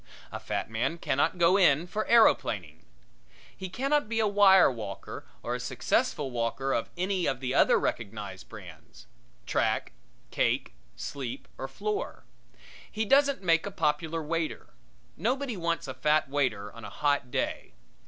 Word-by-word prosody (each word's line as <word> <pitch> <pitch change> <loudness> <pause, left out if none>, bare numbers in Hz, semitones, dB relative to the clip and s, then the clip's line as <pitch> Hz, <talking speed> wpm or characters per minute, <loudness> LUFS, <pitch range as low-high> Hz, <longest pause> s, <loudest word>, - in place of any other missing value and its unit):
A - - -5
fat - - -3
man 115 +9 -1
cannot 145 +2 0
go 175 +2 +5
in 165 -4 +4
for 210 +4 -3
aeroplaning. 95 - +3 0.7
He 190 - -6
cannot 275 +4 0
be 225 -1 0
a 220 - +3
wire 200 -4 +6
walker 105 -5 -7 0.2
or - - -2
a - - -2
successful 140 -3 0
walker 120 +3 -1
of - - -1
any 185 0 0
of 135 -2 -1
the 130 0 -2
other - - +5
recognized 100 -4 -4
brands 95 -8 -12 0.4
track, - - 0 0.4
cake, - - 0 0.2
sleep 135 -4 -6
or 135 - -3
floor. 205 +10 -4 0.7
He 220 +1 -1
doesn't 275 -1 +3
make 165 0 +3
a - - -5
popular 160 0 -1
waiter. 165 +1 -3 0.4
Nobody 250 - -1
wants 170 -4 -2
a 130 - -4
fat 150 0 +2
waiter 125 -8 -1
on 115 - -11
a - - -7
hot 145 -4 0
day. - - -3
155 Hz, 150 wpm, -28 LUFS, 125-195 Hz, 0.7 s, wire